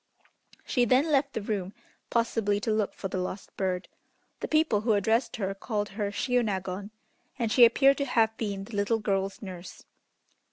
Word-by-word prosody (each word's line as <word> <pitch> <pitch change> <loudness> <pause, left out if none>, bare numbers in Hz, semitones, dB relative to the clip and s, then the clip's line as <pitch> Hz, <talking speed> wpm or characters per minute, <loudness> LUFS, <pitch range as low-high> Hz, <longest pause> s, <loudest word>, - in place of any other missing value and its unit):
She 245 - +2
then 260 +7 +3
left 275 -1 +2
the 220 - -3
room, 200 -2 -3 0.3
possibly 225 -3 +1
to 225 - -1
look 215 -2 -1
for 195 - -4
the 190 -1 -3
lost 185 +2 -5
bird. 185 -1 -2 0.5
The - - -3
people 310 -9 +2
who 225 0 +2
addressed 225 +4 +1
her 195 -4 -2
called 205 +1 -3
her 205 0 -3
Shiônagon, 200 -4 -1 0.5
and 230 -4 -1
she 245 +1 +8
appeared 275 +4 +4
to 280 - 0
have 225 -4 +2
been 200 -4 -3
the 210 +2 -9
little 205 +3 +2
girl's 195 -1 -2
nurse. 185 -2 -9
215 Hz, 170 wpm, -28 LUFS, 195-235 Hz, 0.5 s, she